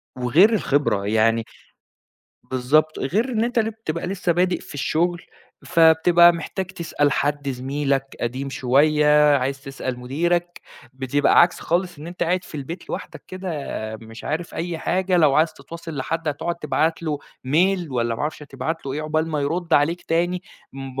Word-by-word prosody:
وغير 150 Hz, -, +4 dB
الخبرة 145 Hz, -, +1 dB
يعني 115 Hz, +1 st, +2 dB, 1.0 s
بالضبط، 145 Hz, +5 st, +1 dB
غير 210 Hz, -, 0 dB
إن 230 Hz, -2 st, 0 dB
أنت 245 Hz, 0 st, -1 dB
اللي 220 Hz, -1 st, +1 dB
بتبقى 175 Hz, -8 st, -5 dB
لسّه 185 Hz, -2 st, 0 dB
بادئ 180 Hz, +1 st, +1 dB
في -, -, -11 dB
الشغل، 170 Hz, +4 st, 0 dB, 0.4 s
فبتبقى 170 Hz, +1 st, +6 dB
محتاج 170 Hz, +3 st, -4 dB
تسأل 165 Hz, -6 st, -1 dB
حد 145 Hz, 0 st, -1 dB
زميلك 135 Hz, +1 st, -2 dB
قديم 130 Hz, +3 st, -3 dB
شويّة، 150 Hz, +3 st, +4 dB
عايز 135 Hz, +1 st, -2 dB
تسأل 135 Hz, -2 st, -5 dB
مُديرك، 170 Hz, +7 st, -1 dB, 0.3 s
بتبقى 130 Hz, +2 st, +3 dB
عكس 175 Hz, 0 st, +3 dB
خالص 175 Hz, -1 st, -1 dB
إن 150 Hz, -, -9 dB
أنت 175 Hz, +1 st, -5 dB
قاعد 180 Hz, +2 st, 0 dB
في -, -, -13 dB
البيت 150 Hz, +5 st, -6 dB
لوحدك -, -, -7 dB
كده، 185 Hz, 0 st, -5 dB, 0.5 s
مش 115 Hz, +1 st, -12 dB
عارف 165 Hz, +3 st, -3 dB
أي 170 Hz, -1 st, -3 dB
حاجة، 185 Hz, +2 st, 0 dB
لو 150 Hz, -5 st, +4 dB
عايز 160 Hz, +1 st, +3 dB
تتواصل 165 Hz, +2 st, -9 dB
لحد 160 Hz, +4 st, -2 dB
هتقعد 160 Hz, +4 st, -2 dB
تبعت 155 Hz, +2 st, 0 dB
له 155 Hz, -3 st, -2 dB, 0.3 s
mail 175 Hz, +2 st, +2 dB
والّا 120 Hz, -2 st, 0 dB
ما -, -, -7 dB
أعرفش 150 Hz, 0 st, -3 dB
هتبعت 140 Hz, +3 st, -5 dB
له 135 Hz, -, -3 dB
إيه 150 Hz, +3 st, -3 dB
عقبال 155 Hz, +1 st, -1 dB
ما 155 Hz, -2 st, -1 dB
يرد 165 Hz, +4 st, -2 dB
عليك 165 Hz, +5 st, +2 dB
تاني، 175 Hz, +2 st, 0 dB, 0.3 s
م 135 Hz, -1 st, -6 dB
155 Hz, 165 wpm, -22 LUFS, 135-175 Hz, 1.0 s, فبتبقى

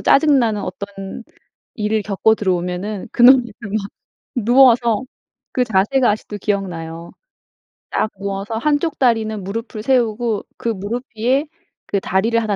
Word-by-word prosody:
짜증 290 Hz, 0 st, +4 dB
나는 220 Hz, -5 st, 0 dB
어떤 195 Hz, +3 st, -7 dB, 0.5 s
일을 215 Hz, 0 st, 0 dB
겪고 215 Hz, +2 st, +2 dB
들어오면은 185 Hz, +1 st, -2 dB
그 -, -, 0 dB
노래를 255 Hz, 0 st, +8 dB, 0.2 s
막 205 Hz, -1 st, -3 dB, 0.5 s
누워서 240 Hz, -1 st, +4 dB, 0.5 s
그 255 Hz, -, +1 dB
자세가 225 Hz, +4 st, +2 dB
아직도 210 Hz, 0 st, -5 dB
기억나요. 170 Hz, -5 st, -4 dB, 0.8 s
딱 215 Hz, -, 0 dB
누워서 200 Hz, +3 st, -4 dB
1 290 Hz, +4 st, +2 dB
쪽 325 Hz, -2 st, -3 dB
다리는 220 Hz, -5 st, +1 dB
무릎을 215 Hz, +2 st, -5 dB
세우고 235 Hz, -4 st, +1 dB
그 235 Hz, -, -2 dB
무릎 220 Hz, +4 st, -3 dB
위에 260 Hz, +7 st, +2 dB, 0.4 s
그 200 Hz, -, 0 dB
다리를 220 Hz, +6 st, +1 dB
1 210 Hz, -2 st, -1 dB
215 Hz, 275 characters per minute, -19 LUFS, 200-240 Hz, 0.8 s, 노래를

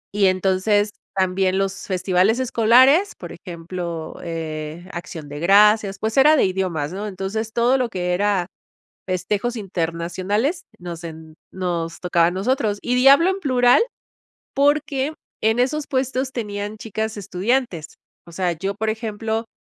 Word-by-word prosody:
Y 200 Hz, -2 st, +4 dB
entonces 190 Hz, +3 st, +2 dB, 0.2 s
también 190 Hz, 0 st, +1 dB
los 195 Hz, 0 st, -2 dB
festivales 185 Hz, +3 st, +2 dB
escolares, 260 Hz, -, +4 dB
por -, -, -9 dB
ejemplo, 170 Hz, -2 st, -6 dB
eh, 160 Hz, 0 st, -5 dB
Acción 160 Hz, -3 st, -7 dB
de 145 Hz, +1 st, -7 dB
Gracias, 200 Hz, +2 st, +4 dB
pues 220 Hz, +2 st, -2 dB
era 300 Hz, +3 st, +7 dB
de -, -, +3 dB
idiomas, 180 Hz, -5 st, -2 dB
¿no? 205 Hz, +2 st, -4 dB
Entonces 205 Hz, +3 st, -4 dB
todo 245 Hz, +3 st, +2 dB
lo 245 Hz, -2 st, 0 dB
que 180 Hz, -3 st, -2 dB
era 195 Hz, -1 st, +1 dB, 0.6 s
festejos 200 Hz, +6 st, -1 dB
internacionales 190 Hz, -, -2 dB
nos 175 Hz, -1 st, -8 dB
en 160 Hz, -1 st, -9 dB, 0.2 s
nos 170 Hz, -3 st, -3 dB
tocaba 170 Hz, -2 st, +2 dB
a -, -, 0 dB
nosotros, 210 Hz, +1 st, 0 dB
y 245 Hz, -, 0 dB
di 250 Hz, +2 st, +4 dB
hablo 330 Hz, +7 st, +7 dB
en 390 Hz, -, -4 dB
plural, 250 Hz, -, +4 dB, 0.7 s
porque 290 Hz, 0 st, +1 dB, 0.3 s
en 220 Hz, +3 st, +2 dB
esos 290 Hz, +4 st, 0 dB
puestos 260 Hz, 0 st, -1 dB
tenían 210 Hz, -2 st, -4 dB
chicas 220 Hz, 0 st, -4 dB
estudiantes. 195 Hz, -, -2 dB, 0.3 s
O 170 Hz, -, -13 dB
sea, 180 Hz, 0 st, 0 dB
yo, 195 Hz, +5 st, -3 dB
por 220 Hz, +1 st, -1 dB
ejemplo, 220 Hz, 0 st, -3 dB
200 Hz, 145 wpm, -21 LUFS, 180-235 Hz, 0.7 s, era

